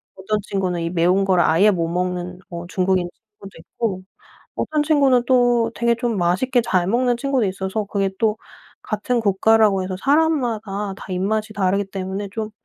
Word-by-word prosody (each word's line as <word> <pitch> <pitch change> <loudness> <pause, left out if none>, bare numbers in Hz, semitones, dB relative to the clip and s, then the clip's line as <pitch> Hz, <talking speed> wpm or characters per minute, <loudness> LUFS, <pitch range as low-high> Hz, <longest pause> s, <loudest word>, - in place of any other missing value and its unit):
어떤 200 +3 -2
친구는 185 -3 -2
이 165 - -2
매운 180 +3 +2
거를 185 -2 +3
아예 190 +7 +4
못 170 -3 -1
먹는 180 0 -3
뭐 170 0 -7
중국인 185 -1 0
친구도 210 -3 -16
있고 190 +2 -4 0.6
어떤 305 -1 0
친구는 280 -5 +3
또 245 -3 +3
되게 235 0 +1
좀 235 -1 -2
맛있게 185 +9 +1
잘 185 -5 +1
먹는 245 +3 +2
친구도 260 -3 0
있어서 190 +3 -3
그게 195 -1 -1
또 220 -1 +1 0.5
같은 230 +3 -1
국가라고 205 -1 +3
해서 185 0 -4
사람마다 235 -9 0
다 - - -11
입맛이 215 +4 -1
다르기 200 0 0
때문에 190 +1 -4
좀 220 -1 -4
200 Hz, 335 characters per minute, -21 LUFS, 185-235 Hz, 0.6 s, 아예